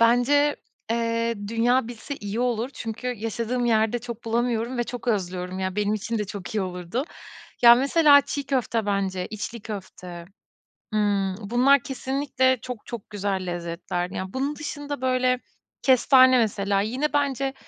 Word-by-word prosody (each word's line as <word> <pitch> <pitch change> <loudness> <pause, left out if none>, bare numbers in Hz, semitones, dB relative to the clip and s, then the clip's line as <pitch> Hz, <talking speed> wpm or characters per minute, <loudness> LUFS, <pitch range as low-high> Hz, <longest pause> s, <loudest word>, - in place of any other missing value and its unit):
bence, 245 +6 +4 0.3
eee, 230 0 0
dünya 235 +2 +2
bilse 240 +4 -7
iyi 205 +3 -4
olur. 245 0 0
Çünkü 225 +2 -6
yaşadığım 235 +1 -2
yerde 220 +1 +2
çok 235 -1 -8
bulamıyorum 235 +1 -1
ve 240 - +1
çok 245 0 -6
özlüyorum 185 -3 -2
ya 190 0 -3
benim 210 0 +1
için 220 +2 -3
de 210 - -1
çok 195 +1 -7
iyi 210 - +1
olurdu. 180 - -3 0.6
Ya, 235 0 +9
mesela 285 +2 +5
çiğ 285 0 -4
köfte 235 -5 0
bence, 190 -2 -1
içli 220 +1 -6
köfte. 185 -5 -8 0.7
Imm, 200 -3 +1 0.2
bunlar 260 +3 +5
kesinlikle 265 -1 0
çok 250 -4 -7
çok 235 -3 -8
güzel 195 -2 -2
lezzetlerdi. 175 +1 -4
Yani, 190 0 -4
bunun 280 +3 -2
dışında, 290 -2 -5
böyle, 255 -1 +1 0.4
kestane 260 0 +6
mesela 200 -3 +1
yine 255 +9 -1
bence 275 -2 0
230 Hz, 145 wpm, -25 LUFS, 205-255 Hz, 0.7 s, Ya